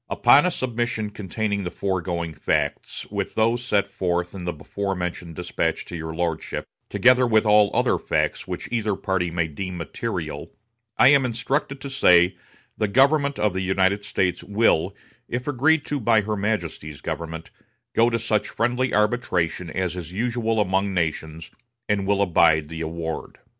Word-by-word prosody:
"Upon 145 Hz, +6 st, +5 dB
a -, -, +3 dB
submission 120 Hz, -7 st, -2 dB
containing 100 Hz, 0 st, -3 dB
the 90 Hz, -, -3 dB
foregoing 85 Hz, -4 st, -2 dB
facts, -, -, -2 dB
with -, -, -3 dB
those 115 Hz, +2 st, +2 dB
set 100 Hz, -5 st, +1 dB
forth 90 Hz, -2 st, -2 dB
in 95 Hz, -3 st, -7 dB
the 90 Hz, -, -1 dB
before 95 Hz, +6 st, -4 dB
mentioned 90 Hz, -2 st, -5 dB
despatch 90 Hz, -2 st, -2 dB
to 90 Hz, -, -8 dB
your 80 Hz, -1 st, -5 dB
lordship, 85 Hz, -2 st, -3 dB, 0.2 s
together 125 Hz, 0 st, +4 dB
with 110 Hz, -1 st, +3 dB
all 105 Hz, -1 st, +5 dB
other -, -, +1 dB
facts -, -, -1 dB
which -, -, -5 dB
either 110 Hz, -4 st, 0 dB
party 95 Hz, -2 st, -1 dB
may 85 Hz, -1 st, -1 dB
deem 90 Hz, +4 st, -5 dB
material, 80 Hz, -3 st, -5 dB, 0.4 s
I 130 Hz, -, +7 dB
am 140 Hz, -2 st, +5 dB
instructed 135 Hz, +3 st, -2 dB
to 140 Hz, -, -6 dB
say 90 Hz, -8 st, +5 dB, 0.4 s
the 110 Hz, -, 0 dB
government 140 Hz, +5 st, +3 dB
of 105 Hz, -2 st, +1 dB
the 95 Hz, -, -2 dB
United 95 Hz, +2 st, +1 dB
States 90 Hz, -3 st, -1 dB
will, 100 Hz, -2 st, +2 dB, 0.3 s
if 125 Hz, +3 st, -3 dB
agreed 145 Hz, +3 st, +2 dB
to 145 Hz, -, -2 dB
by 115 Hz, -2 st, +3 dB
her 105 Hz, +1 st, -2 dB
Majesty's 85 Hz, -8 st, -3 dB
government, 80 Hz, +1 st, -5 dB, 0.4 s
go 115 Hz, +1 st, +4 dB
to 115 Hz, -, 0 dB
such 115 Hz, -2 st, -1 dB
friendly 125 Hz, +2 st, 0 dB
arbitration 95 Hz, -6 st, 0 dB
as 90 Hz, +1 st, -2 dB
is 85 Hz, -2 st, -7 dB
usual 115 Hz, +2 st, -1 dB
among 95 Hz, 0 st, +1 dB
nations, 80 Hz, -1 st, -3 dB, 0.4 s
and 100 Hz, -2 st, 0 dB
will 100 Hz, 0 st, +3 dB
abide 80 Hz, -4 st, +3 dB
the 80 Hz, 0 st, -6 dB
award." 80 Hz, 0 st, -5 dB
100 Hz, 165 wpm, -23 LUFS, 85-115 Hz, 0.4 s, I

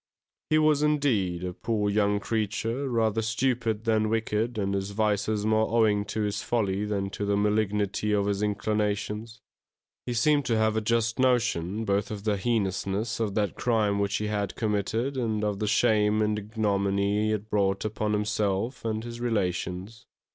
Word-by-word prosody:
He 155 Hz, -, +4 dB
was, 155 Hz, -1 st, +3 dB
indeed, 120 Hz, -, +1 dB
a 90 Hz, -1 st, -3 dB
poor 105 Hz, +1 st, -1 dB
young 105 Hz, 0 st, +2 dB
creature, 115 Hz, +5 st, -2 dB
rather 110 Hz, -2 st, +1 dB
stupid 115 Hz, -1 st, 0 dB
than 110 Hz, -2 st, +2 dB
wicked 115 Hz, +1 st, -1 dB
and 100 Hz, -1 st, -1 dB
his 95 Hz, 0 st, -2 dB
vices 105 Hz, 0 st, 0 dB
more 110 Hz, 0 st, +2 dB
owing 110 Hz, -3 st, +2 dB
to 105 Hz, +2 st, -3 dB
his 105 Hz, -1 st, -1 dB
folly 105 Hz, -4 st, 0 dB
than 100 Hz, -2 st, -2 dB
to 105 Hz, -, -4 dB
the 100 Hz, 0 st, +1 dB
malignity 105 Hz, 0 st, 0 dB
of 100 Hz, -1 st, +2 dB
his 100 Hz, 0 st, -1 dB
inclinations. 105 Hz, +2 st, -2 dB, 0.7 s
He 120 Hz, -, -2 dB
seemed 145 Hz, +4 st, +3 dB
to 115 Hz, -, +1 dB
have 110 Hz, 0 st, +2 dB
a 110 Hz, -, +1 dB
just 115 Hz, +2 st, 0 dB
notion 115 Hz, -6 st, +1 dB
both 100 Hz, 0 st, 0 dB
of 105 Hz, -2 st, -6 dB
the 105 Hz, -2 st, +1 dB
heinousness 100 Hz, -1 st, -1 dB
of 105 Hz, -3 st, -1 dB
that 105 Hz, -2 st, 0 dB
crime 105 Hz, -4 st, +1 dB
which 100 Hz, 0 st, 0 dB
he 105 Hz, -, -1 dB
had 105 Hz, -2 st, -2 dB
committed 110 Hz, +5 st, -1 dB
and 110 Hz, -4 st, -1 dB
of 105 Hz, -2 st, -1 dB
the 105 Hz, -, -1 dB
shame 105 Hz, 0 st, +3 dB
and 105 Hz, 0 st, 0 dB
ignominy 100 Hz, -1 st, 0 dB
he -, -, +1 dB
had 110 Hz, 0 st, -2 dB
brought 100 Hz, -1 st, +1 dB
upon 105 Hz, 0 st, -1 dB
himself 105 Hz, +2 st, -1 dB
and 110 Hz, -1 st, -2 dB
his 120 Hz, 0 st, -7 dB
relations. 95 Hz, -2 st, -2 dB
105 Hz, 170 wpm, -27 LUFS, 100-115 Hz, 0.7 s, He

